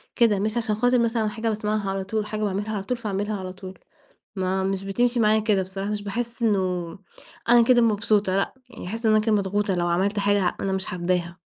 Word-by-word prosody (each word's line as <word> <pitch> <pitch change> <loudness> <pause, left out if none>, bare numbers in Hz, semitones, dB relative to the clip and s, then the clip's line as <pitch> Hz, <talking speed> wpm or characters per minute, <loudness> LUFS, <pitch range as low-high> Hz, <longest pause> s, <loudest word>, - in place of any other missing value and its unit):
كده، 220 -4 +3
مش 215 +3 -1
عشان 225 -2 0
خاطر 245 +3 +3
مثلًا 230 -2 +1
حاجة 225 +2 -2
باسمعها 210 -1 -1
على 195 0 -2
طول، 220 +3 -2
وحاجة 210 0 -4
باعملها 205 +1 -2
على 195 - -3
طول، 250 +5 -2
فاعملها 210 -2 -2
على 185 -1 -6
طول. 185 -1 -10 0.6
ما 190 0 0
مش 195 0 -2
بتمشي 240 +5 +1
معايا 215 0 +4
كده 210 -3 +2
بصراحة، 195 +2 -5
مش 210 -1 -3
باحس 235 +4 -4
إنه 185 -5 0 0.5
أنا 240 0 +7
كده 240 0 +4
مبسوطة، 205 -3 +2
لأ، 195 - -1 0.2
يعني 240 - -9
هاحس 225 +5 -3
إن 220 - +5
أنا 215 - +5
كده 220 +1 0
مضغوطة 205 0 0
لو 175 -1 0
عملت 195 +4 +1
حاجة 200 -2 +2
ه - - -5
أنا 195 - -1
مش 190 0 -2
حاباها. 175 0 -2
205 Hz, 220 wpm, -24 LUFS, 190-220 Hz, 0.6 s, أنا